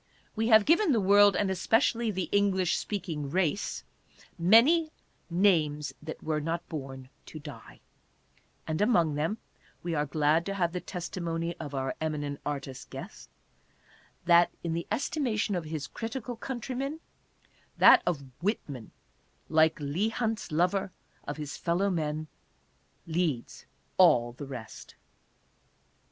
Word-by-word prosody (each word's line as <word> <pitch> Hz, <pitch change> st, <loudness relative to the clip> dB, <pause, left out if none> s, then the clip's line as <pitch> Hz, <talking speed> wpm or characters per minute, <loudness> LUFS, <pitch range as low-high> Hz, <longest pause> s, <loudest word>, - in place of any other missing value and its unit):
We 225 Hz, 0 st, 0 dB
have 220 Hz, -3 st, +6 dB
given 340 Hz, 0 st, +4 dB
the 230 Hz, -, +3 dB
world, 205 Hz, 0 st, +6 dB
and 195 Hz, 0 st, +1 dB
especially 225 Hz, +4 st, +2 dB
the 190 Hz, -3 st, -2 dB
English 190 Hz, -3 st, +2 dB
speaking 165 Hz, -8 st, -4 dB
race, 185 Hz, +3 st, -1 dB, 0.6 s
many 250 Hz, -, +5 dB, 0.2 s
" -, -, -40 dB
names 160 Hz, -5 st, +2 dB
that 160 Hz, +1 st, -8 dB
were 155 Hz, -1 st, -1 dB
not 165 Hz, +3 st, -3 dB
born 135 Hz, -4 st, -7 dB, 0.2 s
to -, -, -9 dB
die," 150 Hz, -1 st, -11 dB, 0.8 s
and 155 Hz, +3 st, -2 dB
among 175 Hz, -9 st, +3 dB
them, 160 Hz, +9 st, -1 dB, 0.5 s
we 170 Hz, -1 st, -2 dB
are 150 Hz, -1 st, 0 dB
glad 155 Hz, +3 st, +2 dB
to 195 Hz, -, -2 dB
have 175 Hz, -3 st, 0 dB
the 180 Hz, -, -3 dB
testimony 170 Hz, -2 st, -4 dB
of 145 Hz, -1 st, -6 dB
our 135 Hz, 0 st, -1 dB
eminent 145 Hz, -2 st, -3 dB
artist 135 Hz, -3 st, -5 dB
guest, -, -, -9 dB, 1.0 s
that, 170 Hz, 0 st, +6 dB
in 170 Hz, -1 st, -2 dB
the 170 Hz, +1 st, -3 dB
estimation 235 Hz, -6 st, -1 dB
of 175 Hz, -3 st, -2 dB
his 155 Hz, -2 st, -4 dB
critical 240 Hz, +2 st, -5 dB
countrymen, 265 Hz, +5 st, -4 dB, 0.8 s
that -, -, +8 dB
of 160 Hz, -6 st, -1 dB, 0.2 s
Whitman, 145 Hz, -, -3 dB, 0.6 s
like 160 Hz, 0 st, +3 dB
Leigh 155 Hz, +9 st, -1 dB
Hunt's 225 Hz, -4 st, -2 dB
lover 180 Hz, +4 st, +1 dB, 0.4 s
of 145 Hz, -, -4 dB
his 150 Hz, -2 st, -6 dB
fellow 185 Hz, +4 st, 0 dB
men, 155 Hz, -2 st, -2 dB, 0.8 s
leads 160 Hz, -7 st, -2 dB, 0.3 s
all 120 Hz, -10 st, +5 dB
the 130 Hz, +4 st, -9 dB
rest. 120 Hz, -5 st, -9 dB
170 Hz, 135 wpm, -29 LUFS, 150-205 Hz, 1.0 s, that